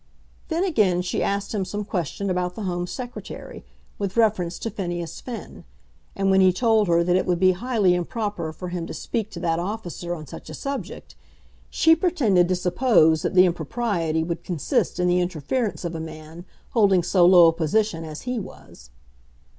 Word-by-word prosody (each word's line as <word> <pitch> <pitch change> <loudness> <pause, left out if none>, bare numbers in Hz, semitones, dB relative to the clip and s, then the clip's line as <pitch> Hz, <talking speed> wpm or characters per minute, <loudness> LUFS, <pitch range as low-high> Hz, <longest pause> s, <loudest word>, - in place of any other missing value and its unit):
Then 335 +1 0
again 210 - +2
she 180 - -2
asked 200 +1 -1
him 205 -3 0
some 205 +3 -4
question 190 0 -3
about 180 0 -1
the 220 - -5
Home 175 -2 -2
Secretary, 245 +4 -8 0.4
with 200 +1 -3
reference 200 -7 +2
to 225 - -4
Phineas 175 -4 -5
Finn; 240 -3 -8 0.5
and 195 0 +1
when 190 0 +5
he 185 -1 +6
told 220 +1 +2
her 170 0 +3
that 175 +1 +2
it 185 - +1
would 180 -1 +2
be 185 0 +5
highly 210 -2 +1
improper 180 -2 -3
for 180 +3 -7
him 175 -2 -4
to - - -7
speak 220 -2 -3
to 180 - -8
that 165 -2 0
officer 175 -2 -4
on 155 -2 -9
such - - -10
a - - -7
subject, 275 0 -6 0.6
she 325 0 +4
pretended 265 - +2
to 185 - +1
suppose 180 -3 +3
that 185 - -2
the 185 0 +7
impropriety 170 -1 -1
would 170 0 -4
consist 170 -1 -1
in 180 - +2
the 180 0 +3
interference 180 - -2
of 170 - -3
a 165 - -4
man 160 +2 -9 0.3
holding 200 -7 +4
so 180 +1 +3
low 175 -1 +8
a - - 0
position 165 +2 0
as 155 -1 -7
he 250 -1 -2
was. 60 - -12
180 Hz, 185 wpm, -24 LUFS, 170-215 Hz, 0.6 s, low